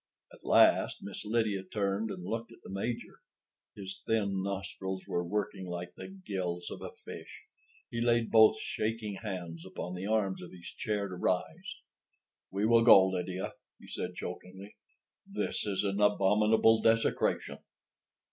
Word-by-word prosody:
At - - -17
last - - +4
Miss 100 - -6
Lydia 105 -3 +1
turned 100 +2 -1
and 90 -3 -6
looked 115 +4 -3
at - - -16
the - - -9
Major. 115 +5 -4 0.6
His 95 -2 -8
thin 100 -4 0
nostrils 95 -1 -4
were 85 - -1
working 100 0 -3
like 90 0 -5
the - - -8
gills 95 - -4
of - - -7
a - - -5 0.2
fish. - - -9 0.5
He 115 - -2
laid 120 -1 +2
both 110 -1 +7
shaking 110 -2 -3
hands 90 -6 -5
upon 90 -1 -6
the 90 +2 -4
arms 105 -3 +1
of 90 - -10
his 85 -1 -10
chair 105 -3 -1
to 95 - -8
rise. 90 0 -2 0.7
"We 100 +2 -1
will 115 +1 +5
go, 95 -5 +8
Lydia," 90 0 -3 0.3
he - - -14
said - - -4
chokingly. 95 +3 -8 0.6
"This - - -2
is 100 -1 0
an 100 0 0
abominable—desecration." 110 +3 +3
100 Hz, 145 wpm, -31 LUFS, 95-110 Hz, 0.7 s, go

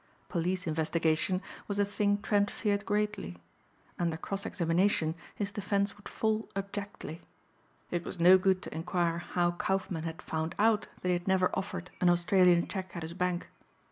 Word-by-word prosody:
Police 180 +1 -1
investigation 160 +3 +1 0.2
was 205 - -2
a 205 - +3
thing 205 0 0
Trent 205 -1 +2
feared 205 -2 -1
greatly. 210 - -1 0.6
Under 170 -2 0
cross 195 +4 -4
examination 170 -1 +2 0.2
his 200 -1 -2
defense 200 0 0
would 205 - -11
fall 220 0 0
abjectly. 200 -4 -5 0.7
It 175 -1 -1
was 180 - -7
no 180 +2 +8
good 185 0 +2
to - - -6
inquire 170 +1 0
how 175 0 0
Kaufmann 185 -1 -1
had 165 +2 -5
found 160 +1 -3
out 220 0 +3 0.2
that 180 - 0
he - - +4
had 175 +1 -2
never 190 -1 +3
offered 190 -2 -4
an 180 - +5
Australian 175 0 +4
check 185 -1 -5
at 170 - -4
his 160 +1 -5
bank. 180 0 -1
185 Hz, 165 wpm, -31 LUFS, 170-200 Hz, 0.7 s, no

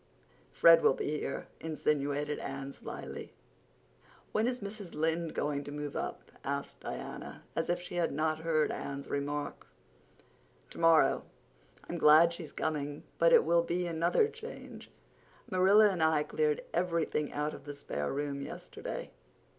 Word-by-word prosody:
"Fred 165 0 +7
will 135 - +4
be 150 0 -2
here," - - -4
insinuated 150 -2 -1
Anne 135 0 -5
slyly. - - -8 1.0
"When 220 +2 +2
is 250 0 -1
Mrs. 200 -3 -7
Lynde 160 +1 0
going 145 -1 -1
to - - -6
move 145 -1 -5
up?" - - -5
asked - - -3
Diana, - - -7
as 165 - -1
if 175 0 +1
she 175 0 -7
had 170 - +1
not 155 +2 0
heard 160 -2 +1
Anne's 140 0 -5
remark. 145 +1 -3 1.0
"Tomorrow. 165 -1 +4 0.7
I'm 170 - -4
glad 160 +3 +7
she's 165 -3 -8
coming—but 150 +2 -1
it - - +7
will 170 +1 +4
be 175 +1 -1
another 170 - +2
change. 460 +2 -10 0.6
Marilla 200 +3 +6
and 180 -4 -3
I 160 -1 +4
cleared 460 - 0
everything 165 -4 0
out 150 +1 -2
of - - -10
the 145 -1 -6
spare 75 - -3
room 140 0 -2
yesterday. 140 - -6
160 Hz, 140 wpm, -32 LUFS, 145-175 Hz, 1.0 s, Fred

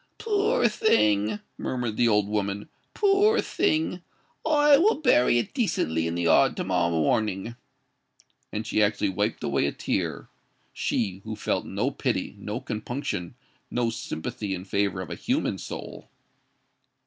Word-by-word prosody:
"Poor 440 +3 +2
thing!" 105 - +2 0.2
murmured 120 -4 -2
the 120 - +3
old 105 -2 +3
woman: 100 -1 -2 0.3
"poor 410 +2 +4
thing! 160 +3 0 0.4
I 295 -2 +5
will 420 +7 +4
bury 125 - +4
it 120 - -2
decently 80 - 0
in 85 - -2
the 85 - -1
yard 85 -1 +4
to - - -1
morrow 90 -2 +1
morning." 95 +7 0 1.0
And 110 +1 -3
she 110 - +1
actually 105 -1 +2
wiped 95 - -1
away 70 0 +1
a - - -1
tear,—she 95 0 -4
who 110 0 -5
felt - - -2
no - - -1
pity, - - -2
no - - -4
compunction, 110 -4 -4 0.3
no 120 -1 0
sympathy 100 -1 -4
in 90 +1 -8
favour 100 -1 0
of 90 - -7
a - - -3
human - - -1
soul! - - -8
105 Hz, 140 wpm, -26 LUFS, 95-155 Hz, 1.0 s, I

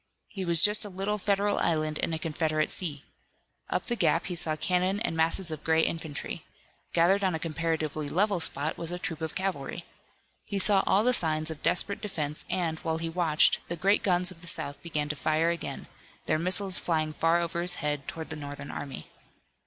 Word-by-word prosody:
He 190 -2 -5
was 170 -1 +3
just 210 0 +5
a 205 - -4
little 195 +3 -2
Federal 200 +1 +1
island 155 -2 0
in - - -1
a 160 - -1
Confederate 155 -1 -1
sea. 150 -6 -2 0.7
Up - - -1
the 240 - 0
gap - - +2
he 180 - -3
saw 160 -2 +4
cannon 185 +5 0
and 230 - -1
masses 165 +2 +2
of 155 -1 -6
gray 160 0 +3
infantry. 160 -3 -4 0.5
Gathered 185 +4 +3
on 185 -3 +1
a - - -3
comparatively 155 -2 -2
level 200 +2 +2
spot 150 -1 -2
was 170 0 0
a 175 - -3
troop 180 -3 -4
of 160 -1 -4
cavalry. 190 -8 -3 0.6
He 200 - -2
saw 195 0 +5
all 200 - +4
the 250 +2 +3
signs 155 -5 +1
of 155 - -7
a - - -28
desperate 200 +4 +1
defense, 155 -8 -3
and, 165 -3 -1
while 160 -2 -2
he 165 0 -2
watched, 165 -2 +3
the 175 - -3
great 195 +5 +2
guns 180 -1 +3
of 165 -2 -13
the 175 - -11
South 145 -3 0
began 150 -3 -2
to 150 - -1
fire 155 +3 +1
again, 170 - -5 0.4
their 155 - +1
missiles 185 +2 +3
flying 155 -2 0
far 165 +2 +2
over 170 0 -2
his 175 +1 +2
head 145 -3 -2
toward 160 -1 -6
the - - -3
Northern 145 -1 -7
army. 135 - -7
165 Hz, 205 wpm, -28 LUFS, 155-185 Hz, 0.7 s, just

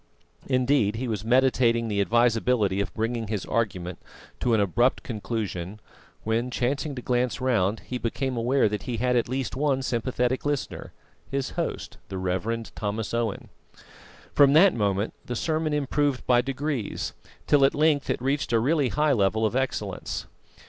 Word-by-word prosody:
Indeed 130 -4 +2
he 125 +3 -3
was 105 -3 -3
meditating 120 -1 +3
the 100 -2 0
advisability 115 -2 +2
of 95 -3 -3
bringing 115 0 -2
his 105 -2 -3
argument 95 -6 -2 0.4
to 120 -2 +2
an - - +2
abrupt 110 +6 +2
conclusion 105 -4 -4 0.4
when, 115 +3 0
chancing 135 +4 -1
to 125 - -6
glance 125 0 0
round, 115 -5 +1
he 125 - -5
became 130 +3 -2
aware 120 +2 +2
that 105 -1 -3
he 120 - -1
had 125 +2 +1
at 120 -1 +1
least 130 -3 -2
one 135 -1 +1
sympathetic 125 +1 -1
listener, 145 -2 -3 0.4
his 135 -1 -2
host, - - -4
the 95 - -4
Rev. 95 +5 -2
Thomas 105 +1 -3
Owen. 115 -3 -2 0.8
From 140 -1 +6
that 180 +5 +7
moment 100 -1 0
the 125 - -4
sermon 155 +2 -1
improved 145 -1 0
by 120 -1 +4
degrees, 135 -2 -3 0.3
till 145 -2 +4
at 135 - +4
length 150 -1 +2
it - - -1
reached 135 -3 0
a 115 - +4
really 140 +3 +2
high 150 +1 +2
level 110 0 +2
of 110 - -1
excellence. 130 0 -2
120 Hz, 160 wpm, -26 LUFS, 110-135 Hz, 0.8 s, that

